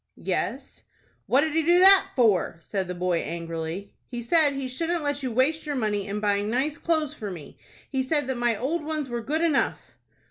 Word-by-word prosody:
"Yes." - - -3 0.4
"What 270 - +4
did 315 0 -1
he 325 - +3
do 345 +3 +4
that 385 +1 +7
for?" 215 -9 +2
said 190 +2 -3
the 180 - -5
boy, 175 -1 0
angrily. 165 +4 -5
"He 240 -2 -6
said 295 +3 +4
he 275 -1 -4
shouldn't 330 +6 -2
let 285 0 0
you 260 -2 -3
waste 295 +7 +1
your 290 - -2
money 210 -5 -1
in 205 +1 -3
buying 205 0 0
nice 280 +6 -1
clothes 315 -3 0
for 215 -9 -6
me. 165 -7 -10 0.3
He 265 -2 0
said 290 +2 +1
that 265 0 -2
my 240 -2 +1
old 300 +8 -2
ones 305 -3 -3
were 240 -1 -3
good 300 +8 -2
enough." 310 -5 +1
260 Hz, 205 wpm, -25 LUFS, 205-305 Hz, 0.4 s, that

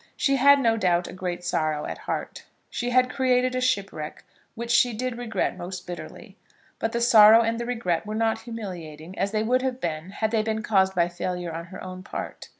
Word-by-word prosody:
She 275 -1 +2
had, 280 +2 +6
no 230 -4 +2
doubt, 175 -4 +1
a - - -8
great 180 -1 -4
sorrow 155 -3 -1
at - - -6
heart. - - -5 0.3
She 245 - -2
had 255 +1 +4
created 255 -1 +1
a 255 - -1
shipwreck 195 -11 -2 0.3
which 235 +1 -4
she 245 0 +4
did 250 +2 -3
regret 240 -2 -2
most 180 +1 -7
bitterly. 175 -1 -9 0.4
But 225 - -1
the 235 - -1
sorrow 225 -2 +8
and 230 +1 -1
the 235 - -4
regret 210 -8 -1
were 215 - -3
not 225 0 +1
humiliating, 180 -8 -8
as 195 - +1
they 215 0 0
would 250 +3 +2
have 260 -1 -2
been 160 -2 -4
had 215 +2 -2
they 225 -2 +2
been 220 0 -2
caused 190 -3 +2
by 170 -1 +3
failure 175 -1 -4
on 165 +1 -5
her 185 +2 -10
own 185 0 -7
part. 185 - -7
215 Hz, 210 wpm, -25 LUFS, 180-240 Hz, 0.4 s, sorrow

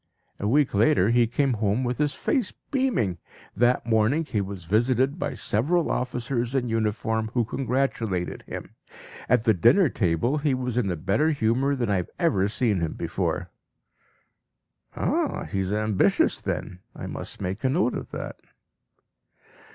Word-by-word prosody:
A 100 - -1
week 140 +4 +3
later 110 0 +4
he 120 -1 +4
came 135 +3 +1
home 105 +4 +1
with 125 +1 -2
his 150 -1 +1
face 255 -10 0 0.2
beaming. 235 - 0 0.4
That 120 +4 +2
morning 115 +8 +2
he 110 -8 -1
was 95 -2 -6
visited 125 - +1
by - - -2
several 145 +11 0
officers 125 0 -2
in 125 -3 0
uniform 110 0 -1
who 120 -2 +2
congratulated 115 -7 -1
him. - - -7 0.6
At 125 -2 +4
the 110 - +4
dinner 130 - +5
table 115 - 0
he 145 -2 +1
was 125 -2 -3
in 120 -6 +1
a 90 - -1
better 100 - +1
humour 135 0 +1
than 120 -5 -1
I 100 - +2
have 90 - -3
ever 115 - +2
seen 105 -2 0
him 80 -2 -2
before." - - -2 1.4
(Ah! - - 0
he 95 - -3
is 95 0 -1
ambitious 105 -1 +2
then! 90 - -4 0.2
I - - -7
must - - -6
make 95 +4 -4
a 130 - +3
note 140 -2 +1
of - - -5
that.) - - -6
120 Hz, 160 wpm, -25 LUFS, 105-135 Hz, 1.4 s, dinner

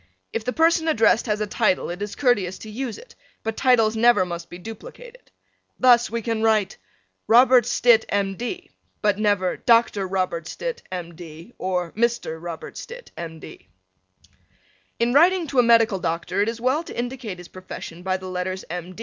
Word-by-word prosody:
If 225 - -2
the 250 - -1
person 325 0 +3
addressed 230 -5 +3
has 210 0 -1
a - - +1
title 210 -4 0
it 180 +3 -7
is 205 0 -4
courteous 205 -9 +1
to 220 - -9
use 240 0 -4
it, - - -15 0.3
but 225 0 -3
titles 225 -4 +3
never 225 -4 +4
must 170 -1 -7
be 175 - -9
duplicated. 485 - -11 0.5
Thus, 245 -2 +5
we 230 0 -3
can 225 -1 -2
write 215 -3 +2 0.5
Robert 245 0 +6
Stitt, 240 -2 +4
M. 195 -1 0
D., 360 - -6 0.3
but 205 -1 +2
never 205 -4 +1
Dr. 230 -5 +3
Robert 185 -3 -2
Stitt, - - -5
M. 175 -2 -5
D, 165 +5 -12
or 180 -2 -2
Mr. 230 -8 -1
Robert 170 -2 -7
Stitt, 485 +1 -10
M. 165 -1 -7
D. 370 - -13 1.3
In 235 +1 +1
writing 345 +4 +4
to 275 -4 0
a - - +6
medical 230 -4 +4
doctor 170 +3 -2
it 210 - +1
is 230 0 -5
well 260 +6 +1
to - - -10
indicate 240 -5 -4
his 180 -1 -11
profession 180 -2 -9
by 185 +1 -1
the 185 0 -9
letters 185 +1 -4
M. 180 +1 -6
220 Hz, 180 wpm, -23 LUFS, 185-245 Hz, 1.3 s, Robert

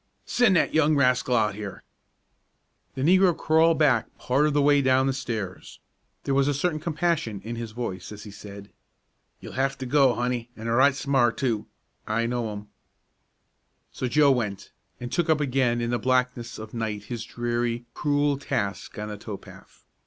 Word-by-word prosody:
"Send 245 -6 +3
that - - +2
young 155 -1 +3
rascal 125 -2 +2
out 105 -4 +2
here!" 100 -1 -7 1.1
The 130 - -3
negro 180 +1 +4
crawled 160 +1 +3
back 135 -7 +2
part 140 +4 +1
of 150 - 0
the 145 - +2
way 145 0 +5
down 130 0 +3
the 135 - +1
stairs. 110 -8 -5 0.4
There 135 - -1
was 135 0 +3
a 145 - +1
certain 155 +2 0
compassion 155 - -1
in 115 +2 -5
his 115 -1 -5
voice 110 -6 -5
as 105 0 -9
he 105 - -10
said, 100 0 -11 0.7
"You'll - - -9
hef 135 +1 0
to 130 - -5
go, 130 -1 +4
honey, 120 0 -2
an' 110 +1 -7
right 130 +4 +4
smart, 135 -4 +1
too. 115 -6 -1 0.4
I 115 +2 0
know 120 -2 -2
him." 105 0 -8 1.2
So 130 - -3
Joe 145 +3 +4
went, 105 -7 -2 0.3
and 120 0 -6
took 170 +2 0
up 155 -1 +4
again 130 -4 +1
in 120 0 -1
the 120 - 0
blackness 125 -2 0
of 110 0 -9
night 110 -3 -3
his 115 +1 -5
dreary, 120 0 -2
cruel 145 -1 +1
task 100 -7 -3
on 105 0 -4
the 105 - -6
tow 105 -2 -6
path. - - -17
125 Hz, 180 wpm, -25 LUFS, 115-145 Hz, 1.2 s, way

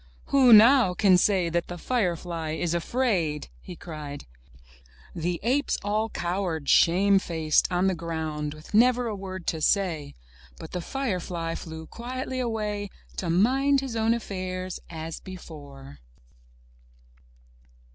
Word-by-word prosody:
Who 265 -3 +6
now 225 -3 +7
can 190 -1 +5
say 185 -1 +3
that 170 +1 -1
the 175 - -6
firefly 170 -7 -2
is 170 +1 -1
afraid?*' 170 - -1
he 180 - -10
cried. 150 -4 -8 0.9
The 170 +1 -2
apes 265 +6 +1
all 215 +2 0
cowered, 175 -6 -3
shame 195 +3 +5
faced, 160 -2 +1
on 180 +1 +1
the 190 - +2
ground 160 -3 -4
with 155 +5 -14
never 245 +3 +4
a 220 -3 -2
word 190 -2 -7
to 160 - -2
say. 160 -5 0 0.4
But - - -10
the 180 - -3
firefly 180 -9 -3
flew 160 -1 -7
quietly 255 +5 -5
away, 210 -4 -2 0.3
to 175 - -2
mind 265 +10 +3
his 265 -4 -5
own 225 +1 +2
affairs 185 -4 -5
as 160 -1 -6
before. 145 - -11
185 Hz, 130 wpm, -26 LUFS, 165-220 Hz, 0.9 s, now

